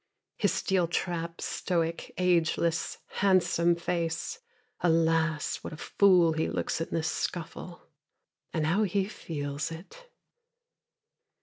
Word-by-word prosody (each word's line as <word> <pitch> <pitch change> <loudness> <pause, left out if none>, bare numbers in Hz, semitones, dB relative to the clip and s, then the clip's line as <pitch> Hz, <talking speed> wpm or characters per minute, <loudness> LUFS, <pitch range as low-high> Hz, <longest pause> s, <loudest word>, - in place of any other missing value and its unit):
His 205 -5 +2
steel 190 -1 +1
trap, 170 -1 -2
stoic, 170 -2 -2
ageless, 170 -2 +1 0.2
handsome 180 -3 +4
face. 170 - -2 0.4
Alas, 165 -2 +2
what - - -8
a - - -8
fool 180 -2 +4
he 160 0 0
looks - - -2
in 165 - -1
this 160 -1 -1
scuffle. 175 +1 -5 0.6
And 160 -2 0
how 175 +7 +2
he 200 -1 +1
feels 145 -7 -4
it! 200 - -11
170 Hz, 110 wpm, -29 LUFS, 160-180 Hz, 0.6 s, handsome